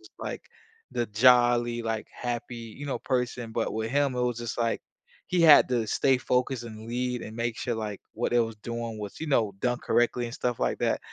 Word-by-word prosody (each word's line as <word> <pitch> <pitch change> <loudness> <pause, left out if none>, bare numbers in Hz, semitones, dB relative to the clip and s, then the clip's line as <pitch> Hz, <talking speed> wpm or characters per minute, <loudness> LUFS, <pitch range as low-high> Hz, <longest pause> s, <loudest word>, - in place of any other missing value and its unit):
just, - - -17
like, - - -5 0.5
the 120 - -1
jolly, 120 +1 +4
like, 115 -1 -2
happy, 120 0 -4
you 115 +5 -8
know, 130 -4 -2
person, 125 -2 -2
but 115 0 -1
with 110 +1 -2
him, 140 -2 +2
it 125 - 0
was 120 -1 0
just 120 -2 -4
like 115 -1 0 0.5
he 180 -1 +1
had 155 -3 +8
to 120 -3 0
stay 130 +4 +2
focused 125 0 0
and 110 -1 -9
lead 125 0 -2
and 110 - -8
make 115 -1 -2
sure, 120 - -1
like, 105 -3 -4
what 120 - -1
it 120 - +5
was 115 -1 -2
doing 115 0 -5
was, 105 -1 -7
you 160 - -3
know, 115 -8 +2
done 125 -1 0
correctly 120 0 +1
and 115 - -7
stuff 120 -2 -2
like - - 0
that, - - +1
120 Hz, 215 wpm, -27 LUFS, 115-125 Hz, 0.5 s, had